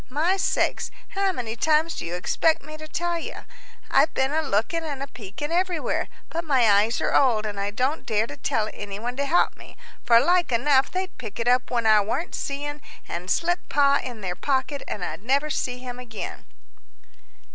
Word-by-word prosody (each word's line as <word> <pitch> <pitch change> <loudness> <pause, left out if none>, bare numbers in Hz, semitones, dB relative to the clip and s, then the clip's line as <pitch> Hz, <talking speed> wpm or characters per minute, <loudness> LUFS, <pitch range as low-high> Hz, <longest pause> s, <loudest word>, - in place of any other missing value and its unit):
My 315 +8 +2
sakes! 390 - 0 0.2
how 390 0 +1
many 235 -9 -4
times 315 +5 +2
do - - -5
you 175 - -3
expect 315 - +1
me 310 +1 -9
to 310 0 -9
tell 345 +2 -1
you? - - -7 0.5
I've 310 - +5
been 265 +1 +1
a 315 +1 +1
looking 290 +5 0
and 285 -4 -4
a - - -5
peeking 245 +6 -7
everywhere, 355 -2 0 0.2
but 335 +1 -2
my 265 -7 +3
eyes 210 +4 +3
are - - 0
old, 230 -6 +4
and 205 -2 -4
I 200 0 -1
don't 255 +9 -1
dare 220 -1 +1
to 285 - -8
tell 225 -6 -1
any 200 -1 -6
one 240 +3 -4
to 280 - 0
help 345 - +3
me, - - -14 0.3
for 230 -1 +6
like 350 +2 +3
enough 265 +3 +3
they'd 370 -3 -4
pick 220 -4 -7
it 230 - -1
up 250 +1 +3
when 235 -2 0
I 215 -1 +6
warn't 240 - -2
seein', 290 +1 -4 0.3
and 175 +2 -5
slip 350 - 0
Pa 280 -1 +4
in 240 -4 -7
their 180 -2 -3
pocket, 270 +2 -1
and 185 -4 -3
I - - -4
never'd 275 +7 0
see 250 -1 -2
him 250 -1 -7
again." 235 -3 -7
265 Hz, 200 wpm, -25 LUFS, 225-310 Hz, 0.5 s, for